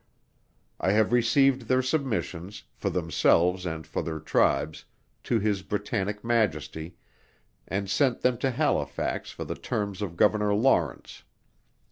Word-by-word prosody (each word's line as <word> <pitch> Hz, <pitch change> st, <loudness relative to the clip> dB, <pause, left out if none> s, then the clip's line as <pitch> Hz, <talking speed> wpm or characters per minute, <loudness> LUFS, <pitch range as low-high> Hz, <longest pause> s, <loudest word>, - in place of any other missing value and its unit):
I 95 Hz, -, +2 dB
have 110 Hz, +2 st, +2 dB
received 125 Hz, +1 st, +3 dB
their 130 Hz, +1 st, +2 dB
submissions, 110 Hz, -, -2 dB
for -, -, -3 dB
themselves 90 Hz, +2 st, +2 dB
and 80 Hz, -2 st, -5 dB
for 80 Hz, -, -3 dB
their 80 Hz, -1 st, -4 dB
tribes, 80 Hz, 0 st, +1 dB, 0.4 s
to 120 Hz, -, +2 dB
His 105 Hz, -2 st, 0 dB
Britannic 105 Hz, +1 st, -3 dB
Majesty, 85 Hz, -8 st, -1 dB, 0.7 s
and 100 Hz, +1 st, -2 dB
sent 120 Hz, +6 st, +1 dB
them 125 Hz, -2 st, +1 dB
to 135 Hz, -, +1 dB
Halifax 125 Hz, -, -1 dB
for -, -, -6 dB
the -, -, -3 dB
terms 100 Hz, -3 st, -3 dB
by 105 Hz, -, -1 dB
Governor 105 Hz, +4 st, +2 dB
Lawrence. 105 Hz, -, +1 dB
105 Hz, 130 wpm, -27 LUFS, 90-120 Hz, 0.7 s, received